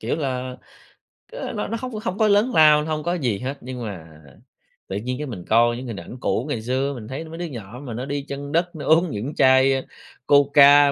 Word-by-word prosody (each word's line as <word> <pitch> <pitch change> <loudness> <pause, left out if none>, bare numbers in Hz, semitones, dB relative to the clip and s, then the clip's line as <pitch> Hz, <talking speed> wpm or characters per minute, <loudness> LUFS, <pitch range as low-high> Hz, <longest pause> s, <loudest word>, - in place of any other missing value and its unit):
kiểu 115 +7 -2
là, 130 -3 -3 0.8
ơ, - - -5
nó - - -3
nó 230 - -3
hông 255 -1 -5
nó 215 - -4
không 200 -3 -4
có 220 - +3
lớn 210 +5 +3
lao, 150 -1 +6
hông 155 -1 -3
có 175 +1 -1
gì 125 - -1
hết, 135 +2 -4
nhưng 125 -1 -7
mà 95 -7 -7 0.8
tự 95 - -4
nhiên 125 +4 -3
cái 150 -1 -5
mình 90 -8 -7
coi 120 +1 +4
những 130 - -7
hình 115 - -5
ảnh 105 +9 -10
cũ 120 - -1
ngày 115 -6 -2
xưa, 130 +4 -1
mình 110 -4 -8
thấy 135 +6 -6
mấy 160 +1 -9
đứa 175 - -4
nhỏ 120 -3 -8
mà 120 -5 -6
nó 125 +3 -4
đi 140 0 -3
chân 140 +1 -6
đất 175 +2 0
nó 150 -3 -6
uống 165 +2 +4
những 120 +9 -4
chai, 130 0 +5
ơ, 135 - 0 0.5
Coca, 145 0 +6
140 Hz, 240 wpm, -22 LUFS, 125-155 Hz, 0.8 s, lao